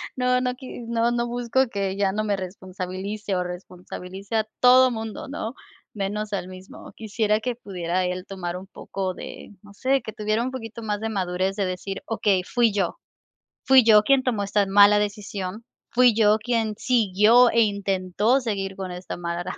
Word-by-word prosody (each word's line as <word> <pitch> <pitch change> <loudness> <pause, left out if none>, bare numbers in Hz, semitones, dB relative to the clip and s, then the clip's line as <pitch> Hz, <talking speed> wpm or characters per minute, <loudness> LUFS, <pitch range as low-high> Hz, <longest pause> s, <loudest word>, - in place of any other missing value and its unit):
No 250 0 +2
no 250 0 -1
qui 255 -1 -9
no, 235 0 +1
no 240 0 0
busco 245 +2 0
que 195 -3 -2
ya 195 -1 +1
no 215 +2 -2
me 205 -1 0
responsabilice, 190 +2 -5
o 180 - 0
responsabilice 180 +3 -8
a 220 -1 +2
todo 255 +1 +6
mundo, 225 -2 -6
¿no? 260 -4 -5 0.4
Menos 210 +1 -3
a 200 - +1
él - - -8
mismo. 185 +1 -12
Quisiera, 215 -1 0
que 245 +2 -3
pudiera 185 -5 -2
él 180 0 -3
tomar 180 -2 -5
un 190 +1 -10
poco 190 -2 -5
de, - - -9
no 205 - -15
sé, 265 +6 +1
que 220 - -7
tuviera 215 +1 -1
un 255 - -3
poquito 230 -3 -7
más 210 -1 -2
de 225 - -3
madurez, 190 -1 -1
de 200 -1 0
decir: 185 +2 -5
"Okey, 205 -4 +1
fui 235 +4 +2
yo 195 -4 -1 0.7
fui 265 -2 +7
yo 215 -2 +7
quien 265 +3 +3
tomó 225 -5 0
esta 200 0 +1
mala 205 +1 +6
decisión, 205 0 -4 0.3
fui 250 0 +5
yo 215 -1 +4
quien 225 -1 -1
siguió 230 +1 +4
e 230 - +3
intentó 200 +3 +1
seguir 195 -5 -3
con 190 -1 -6
esta 180 +1 -6
mala, 175 0 -4
210 Hz, 185 wpm, -24 LUFS, 190-230 Hz, 0.7 s, fui